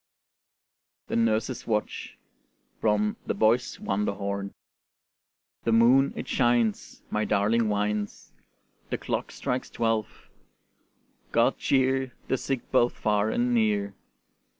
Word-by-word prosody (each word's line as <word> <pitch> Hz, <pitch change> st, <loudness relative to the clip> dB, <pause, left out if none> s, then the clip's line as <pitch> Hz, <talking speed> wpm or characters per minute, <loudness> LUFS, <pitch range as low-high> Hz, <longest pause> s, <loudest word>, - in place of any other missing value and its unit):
THE -, -, -1 dB
NURSE'S 115 Hz, +2 st, 0 dB
WATCH 105 Hz, -2 st, -2 dB, 0.6 s
From 105 Hz, -1 st, +1 dB
'The -, -, 0 dB
Boy's 120 Hz, +3 st, +2 dB
Wonderhorn' 100 Hz, 0 st, -2 dB, 1.1 s
The 115 Hz, -, +1 dB
moon 125 Hz, +5 st, +5 dB
it -, -, -5 dB
shines, 120 Hz, -4 st, +1 dB
My 105 Hz, -, 0 dB
darling 110 Hz, +2 st, +2 dB
whines; 105 Hz, 0 st, -2 dB, 0.6 s
The -, -, -1 dB
clock -, -, -3 dB
strikes 125 Hz, +1 st, -3 dB
twelve: 115 Hz, -2 st, -2 dB, 1.0 s
God -, -, +2 dB
cheer 130 Hz, -1 st, +1 dB, 0.2 s
The 130 Hz, -, +2 dB
sick 135 Hz, -3 st, -3 dB
both 120 Hz, -2 st, +3 dB
far 105 Hz, 0 st, +1 dB
and 120 Hz, +2 st, +1 dB
near. 105 Hz, -3 st, +1 dB
110 Hz, 105 wpm, -27 LUFS, 105-120 Hz, 1.1 s, moon